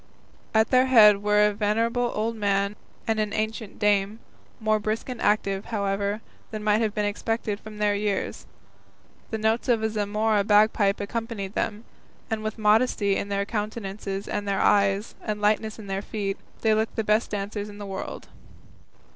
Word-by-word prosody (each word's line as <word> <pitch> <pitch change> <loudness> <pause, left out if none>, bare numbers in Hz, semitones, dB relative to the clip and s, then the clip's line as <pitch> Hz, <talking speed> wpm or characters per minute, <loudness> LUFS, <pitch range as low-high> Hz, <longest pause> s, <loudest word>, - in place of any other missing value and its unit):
At 220 0 +3
their 255 0 +5
head 210 -5 +7
were 210 0 +4
a 210 - +2
venerable 230 +4 0
old 225 +2 -1
man 200 -1 0 0.3
and 225 -2 0
an 210 -1 -1
ancient 220 0 -3
dame, 205 0 +2 0.4
more 215 -1 +2
brisk 215 +4 -3
and 250 -2 -5
active, 200 -2 +1
however, 200 -1 -1 0.3
than 215 -1 -6
might 210 +1 +3
have 215 -2 0
been 210 -1 0
expected 210 0 -2
from 215 -1 -11
their 210 -1 +2
years. 205 -1 -2 0.8
The 220 - -2
notes 220 +3 0
of 230 -2 +3
a 220 - 0
Zamora 210 0 +1
bagpipe 210 -1 +3
accompanied 210 -2 -4
them, 215 +1 -2 0.5
and 220 -1 -1
with 215 +1 -4
modesty 210 -2 +3
in 200 - -3
their 200 0 0
countenances 205 -2 -4
and - - -1
in 205 - -8
their 200 -1 0
eyes, 200 0 +2
and 210 -1 -3
lightness 215 +1 +1
in 220 - -9
their 195 0 -3
feet, 200 -2 -3 0.2
they 220 -1 +3
looked 220 +1 0
the 220 - 0
best 215 +2 +2
dancers 205 +1 -4
in 205 - -11
the 205 - -7
world. 195 -1 -6
210 Hz, 175 wpm, -25 LUFS, 200-220 Hz, 0.8 s, head